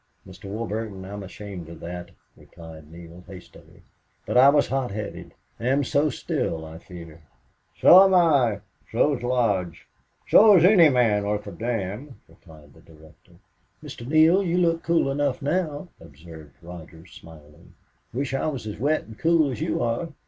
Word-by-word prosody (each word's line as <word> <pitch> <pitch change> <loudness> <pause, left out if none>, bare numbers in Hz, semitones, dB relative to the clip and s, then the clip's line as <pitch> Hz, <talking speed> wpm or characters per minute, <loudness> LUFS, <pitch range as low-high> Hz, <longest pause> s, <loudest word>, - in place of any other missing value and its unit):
"Mr. 95 +1 -14
Warburton, 105 -1 -5
I'm 100 +1 -8
ashamed 95 -3 -10
of 85 - -11
that," 90 +1 -8 0.3
replied 80 -2 -14
Neale, 85 +1 -13
hastily. 95 -2 -15 0.4
"But - - -4
I 130 +2 +7
was 145 0 +2
hot 135 -2 -2
headed... 105 +1 -8 0.2
am 135 +4 0
so 145 +4 0
still, 80 - -4
I 80 +1 -11
fear." 85 -2 -13 0.6
"So 185 +2 +8
am 190 -1 +2
I. 135 - +2 0.3
So 140 +5 +1
is 120 - -9
Lodge. 110 -9 -1 0.4
So 210 -2 +7
is 170 - +4
any 180 -5 +6
man 115 -6 +1
worth 105 0 -3
a - - -8
damn," 115 +3 -5
replied 75 -4 -19
the - - -20
director. 80 -1 -20 0.5
"Mr. 120 - -10
Neale, 160 +6 +4
you 180 -2 -1
look 165 -2 +1
cool 165 -4 0
enough 140 -1 -1
now," 155 +2 -3
observed 80 0 -15
Rogers, 85 0 -13
smiling. 75 -2 -17 0.4
"Wish 135 +2 -4
I 135 - -1
was 135 -8 -5
as 105 -1 -7
wet 150 +5 0
and 110 -1 -15
cool 165 -4 +2
as 120 - -7
you - - -2
are. 120 +8 -2
110 Hz, 165 wpm, -23 LUFS, 85-145 Hz, 0.6 s, So